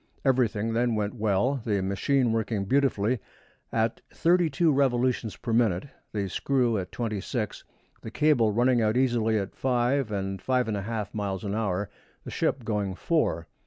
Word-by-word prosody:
Everything 115 -4 +1
then 120 0 +1
went 105 -1 -1
well, 110 +4 +1
the 105 -3 0
machine 120 +6 +1
working 110 -2 -1
beautifully, 125 -2 +1 0.5
at 115 0 0
thirty 175 0 +3
two 155 +3 +2
revolutions 125 -4 +1
per 115 - -4
minute, 115 0 +2 0.2
the 100 -2 -2
screw 125 +3 +1
at 90 -1 -6
twenty 110 -4 -3
six, 110 0 -4 0.4
the - - -7
cable 125 -4 +3
running 120 +2 +3
out 110 +2 +2
easily 120 -4 +2
at 100 -2 -3
five 125 -1 +1
and 95 -2 -3
five 125 -2 +1
and 110 - -1
a 100 - -2
half 105 -1 -4
miles 100 -2 -3
an 100 -1 -3
hour, 105 -2 -1 0.4
the - - -8
ship 130 - -1
going 105 -4 -1
four. 125 - 0
115 Hz, 165 wpm, -27 LUFS, 105-130 Hz, 0.5 s, thirty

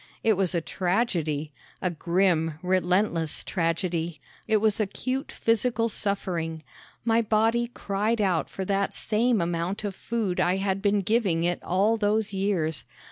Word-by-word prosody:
It 225 - +5
was 190 -2 0
a 170 - +1
tragedy 165 -6 -1 0.3
a 180 - -1
grim, 170 -2 +1
relentless 180 -2 +1
tragedy! 165 -2 -1 0.3
It 220 -1 +4
was 215 +1 +2
acute 255 +6 -2
physical 230 0 +1
suffering. 175 -7 -2 0.4
My 230 0 +4
body 225 +2 +2
cried 210 +2 -1
out 185 -6 +1
for 190 - -5
that 195 0 0
same 230 +1 +1
amount 170 +4 -2
of 205 -2 -2
food 215 -6 -2
I 180 +1 +3
had 195 0 -1
been 205 0 +2
giving 195 -5 +1
it 175 0 0
all 205 +5 +2
those 210 -1 +1
years. 190 -5 0
195 Hz, 140 wpm, -26 LUFS, 170-215 Hz, 0.4 s, It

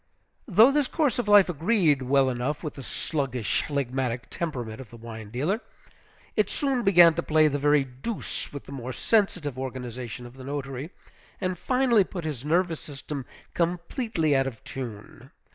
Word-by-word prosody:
Though 220 +5 +7
this 290 -1 +2
course 295 -7 +1
of 240 - -1
life 205 -2 +7
agreed 165 - +2
well 135 +1 +3
enough 130 +6 -2
with 155 - -4
the 135 - -9
sluggish, 130 -4 -1
phlegmatic 130 -3 -2
temperament 125 -8 -4
of 125 - -12
the 120 - -12
wine 110 -2 -9
dealer, 150 - -1 0.7
it 210 -2 +2
soon 270 -1 0
began 175 -5 +7
to - - -1
play 155 0 +4
the 145 -1 -1
very 145 0 +4
deuse 135 - -5
with 140 - -7
the - - -11
more 130 -2 -5
sensitive 180 - +1
organization 125 -2 -5
of 120 - -11
the 130 - -9
notary, 140 +1 -4 0.5
and 185 -1 -1
finally 250 -5 +3
put 175 -3 -7
his 145 -6 -4
nervous 165 +1 +1
system 140 -1 -7 0.3
completely 170 - 0
out 135 0 +2
of 115 -5 -7
tune. 120 -6 -8
145 Hz, 165 wpm, -26 LUFS, 130-180 Hz, 0.7 s, Though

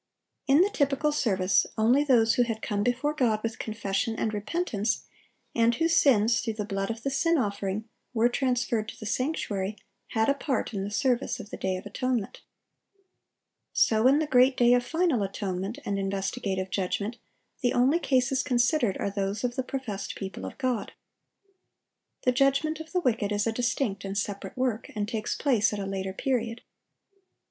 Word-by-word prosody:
In 280 +4 +6
the 400 +3 +3
typical 290 -3 +1
service, 190 -9 +2
only 240 +6 +4
those 230 -5 +4
who - - +2
had 225 -2 -1
come 205 -2 -1
before 250 +6 0
God 230 -7 +1
with 225 0 -3
confession 215 +1 -2
and 220 -1 -1
repentance, 215 - -1 0.5
and 230 0 +3
whose 330 0 +2
sins, 230 -4 +4
through 225 - -3
the 210 -1 -3
blood 195 -1 -2
of 225 0 -5
the 275 - -1
sin 330 +5 +2
offering, 200 -2 -2 0.2
were 235 -1 +3
transferred 240 -3 0
to - - -10
the 215 - -7
sanctuary, 210 -6 -2 0.3
had 220 -2 +1
a 280 - +4
part 275 -3 -2
in 195 -2 -2
the 200 - -3
service 255 +3 0
of 210 -3 -9
the - - -4
day 190 -1 -1
of 185 - -9
atonement. 235 0 -2 1.3
So 220 +2 +4
in 275 +2 +5
the 310 - +1
great 255 -1 +4
day 240 0 +5
of 245 0 +3
final 325 - +1
atonement 195 +2 -3
and 200 -1 -1
investigative 195 0 -2
judgment, 200 +4 -2 0.4
the 245 - +2
only 265 +7 +3
cases 265 -3 +2
considered 245 - +2
are 200 - -2
those 200 +2 -2
of 245 -1 -1
the - - 0
professed 250 -7 -5
people 195 -1 -6
of - - -9
God. 250 -6 -2 1.3
The 250 - +4
judgment 275 +4 +2
of 320 0 -9
the 360 - +1
wicked 220 -8 0
is 205 0 +1
a 225 - +1
distinct 235 -4 -1
and 195 0 -4
separate 205 +3 -4
work, 250 -3 -1
and 205 -1 -1
takes 215 -1 -2
place 235 -6 +2
at 210 - -3
a 200 - -3
later 195 0 -3
period. 230 +2 -2
230 Hz, 180 wpm, -27 LUFS, 205-260 Hz, 1.3 s, In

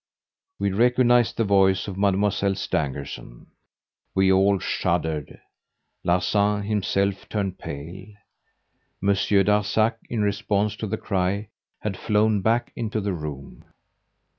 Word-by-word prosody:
We 100 0 0
recognised 120 +2 +3
the 115 - +2
voice 95 -1 +3
of 100 - -5
Mademoiselle 100 0 +1
Stangerson. 70 -9 -4 0.6
We 95 0 +4
all 95 +1 +4
shuddered. 80 -5 -2 0.6
Larsan 100 +4 +1
himself 100 -1 -1
turned 95 -3 -2
pale. 85 +7 -8 0.9
Monsieur 100 0 +2
Darzac, 105 +3 +2
in 115 -3 -1
response 105 0 0
to 110 - -4
the 110 +2 -2
cry, 100 +1 -1 0.3
had 105 -3 -3
flown 105 0 +2
back 115 +4 +1
into 110 -2 -2
the 100 -2 -2
room. 75 -4 -7
100 Hz, 115 wpm, -24 LUFS, 95-105 Hz, 0.9 s, We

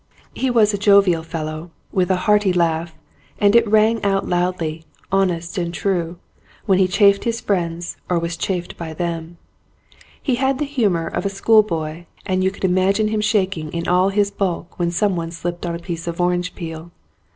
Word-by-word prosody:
He 265 - -1
was 220 -4 +3
a 205 - -2
jovial 200 -4 +4
fellow, 160 0 -5 0.2
with 185 -1 +1
a 190 - +3
hearty 210 -2 +4
laugh, 165 -2 0 0.4
and 205 +1 +3
it 235 -1 +5
rang 220 +1 +3
out 195 -1 +1
loudly, 175 -3 -1 0.3
honest 180 -2 0
and 170 -1 -2
true, 175 -2 -2 0.5
when 195 -3 +3
he 190 - +4
chaffed 200 +1 +4
his 230 0 -1
friends 175 -5 -2
or 180 - +2
was 170 0 -2
chaffed 175 0 -3
by 160 -2 -6
them. 170 0 -4 0.8
He 255 -4 0
had 270 0 +2
the 295 - -1
humour 210 - 0
of - - -3
a 200 - 0
school 215 +3 +4
boy 165 -4 -5 0.2
and 185 -1 0
you 190 - +3
could 195 0 -4
imagine 190 +4 +2
him 215 0 0
shaking 195 -7 0
in 170 0 -3
all 180 +2 +3
his 200 0 +1
bulk 185 -4 -3
when 170 -1 +1
someone 175 -2 0
slipped 175 +1 -5
on 170 - -2
a - - -3
piece 170 -1 -6
of 170 0 -4
orange 180 0 0
peel. 165 -1 -7
180 Hz, 185 wpm, -20 LUFS, 170-200 Hz, 0.8 s, it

